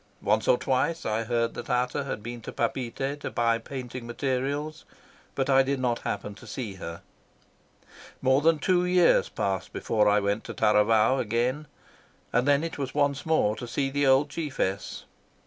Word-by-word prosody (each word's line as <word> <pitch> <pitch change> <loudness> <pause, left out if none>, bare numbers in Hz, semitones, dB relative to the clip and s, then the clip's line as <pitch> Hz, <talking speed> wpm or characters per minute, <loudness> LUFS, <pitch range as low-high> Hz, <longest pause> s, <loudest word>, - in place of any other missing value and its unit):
Once 105 +1 +1
or 125 - +5
twice 135 +7 0
I 110 +1 -1
heard 115 0 0
that 120 - -7
Ata 125 +3 0
had 105 -6 -5
been 120 +1 -6
to - - -7
Papeete 130 +4 -2
to - - -4
buy 115 -1 +1
painting 125 -1 -7
materials, 140 +5 -2 0.5
but 135 -1 0
I 135 -1 +5
did 135 0 -1
not 120 -2 0
happen 105 - -4
to 110 +4 -14
see 110 -2 -5
her. 85 -3 -7 1.2
More 130 +1 +3
than 165 +1 +4
two 180 +3 +2
years 180 -1 +4
passed 95 -1 -2
before 105 -2 +1
I 105 0 +4
went 100 +1 -1
to - - -7
Taravao 110 +3 +3
again, 125 +7 -1 0.7
and 125 +3 +2
then 145 +1 +4
it 165 -2 -5
was 135 -1 -4
once 145 0 0
more 135 -10 +2
to 120 - -7
see 135 +3 -1
the 145 0 +1
old 135 +2 +4
chiefess. 135 - -3
125 Hz, 175 wpm, -27 LUFS, 115-140 Hz, 1.2 s, or